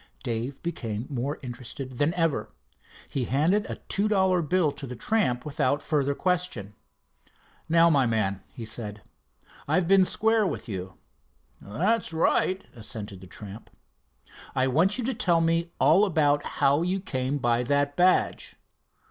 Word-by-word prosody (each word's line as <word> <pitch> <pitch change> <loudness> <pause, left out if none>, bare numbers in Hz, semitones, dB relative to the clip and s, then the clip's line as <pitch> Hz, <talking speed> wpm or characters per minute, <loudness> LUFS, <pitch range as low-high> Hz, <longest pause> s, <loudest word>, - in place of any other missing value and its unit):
Dave 120 +2 -4
became 115 -10 -4
more 135 +3 -2
interested 125 +1 -7
than 145 +3 +3
ever. 150 -11 0 0.6
He 130 -3 -2
handed 165 - +1
a - - -3
two 200 +2 +1
dollar 190 -4 +2
bill 165 -1 +1
to 140 - -8
the 125 - -6
tramp 125 - 0
without 145 -1 0
further 140 -2 0
question. 175 - -1 1.0
"Now, 165 +1 +6
my 135 -4 +3
man," 100 -4 0
he 115 - -8
said, 105 -2 -5 0.6
"I've 165 +4 +2
been 195 0 +6
square 220 +2 +2
with 155 - -5
you." 95 -3 -6 0.7
"That's 180 - 0
right," 185 +3 +1
assented 105 -4 -8
the 95 - -11
tramp. 100 +4 -10 0.9
"I 130 0 +2
want 165 - +2
you 250 - -2
to 260 +3 -1
tell 180 -8 +2
me 165 +1 +1
all 190 +6 +5
about 145 -5 +2
how 140 +2 +3
you 185 +3 0
came 135 -6 -2
by 120 -3 +1
that 145 +3 0
badge." 180 +3 +2
145 Hz, 150 wpm, -26 LUFS, 120-180 Hz, 1.0 s, Now